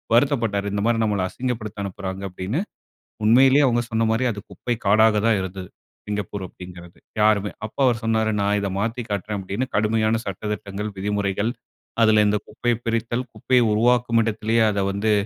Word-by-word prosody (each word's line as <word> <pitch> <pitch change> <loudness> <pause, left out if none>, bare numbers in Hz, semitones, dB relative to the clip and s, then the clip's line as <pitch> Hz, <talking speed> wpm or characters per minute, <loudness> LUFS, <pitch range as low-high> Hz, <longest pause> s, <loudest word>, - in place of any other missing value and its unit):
வருத்தப்பட்டாரு. 115 -6 +1
"இந்த 100 - -1
மாரி 115 -1 +2
நம்மல 100 -3 0
அசிங்கப்படுத்த 110 -4 -4
அனுப்புறாங்க" 95 0 -5
அப்டின்னு. 95 - -3 0.6
உண்மையிலேயே 135 +5 +6
அவங்க 120 -1 +2
சொன்ன 115 0 +1
மாரி 115 +3 +1
அது 105 - -6
குப்பை 120 - -3
காடாக 110 +2 +5
தான் 115 -2 +4
இருந்துது, 95 0 -6 0.4
சிங்கப்பூர் 100 -1 -4
அப்டிங்கிறது. 90 -1 -12 0.2
யாருமே 105 -1 +3
அப்போ 110 - -10
அவுரு 120 -3 +3
சொன்னாரு 110 -1 +1
"நான் 100 +1 +2
இத 100 - -1
மாத்தி 115 +4 -2
காட்றேன்" 105 +1 -2
அப்டின்னு. 100 +7 -3
கடுமையான 110 +1 +2
சட்ட 100 +1 -6
திட்டங்கள், 105 +1 -5
விதிமுறைகள் 100 +2 -1 0.5
அதுல 110 -1 +5
இந்த 105 0 +2
குப்பையை 120 +2 -1
பிரித்தல், 115 +2 -1
குப்பையை 125 +3 +2
உருவாக்கும் 120 +1 +3
இடத்திலேயே 110 +1 +1
அத 100 -1 -1
வந்து 100 +2 0
110 Hz, 155 wpm, -23 LUFS, 100-115 Hz, 0.6 s, உண்மையிலேயே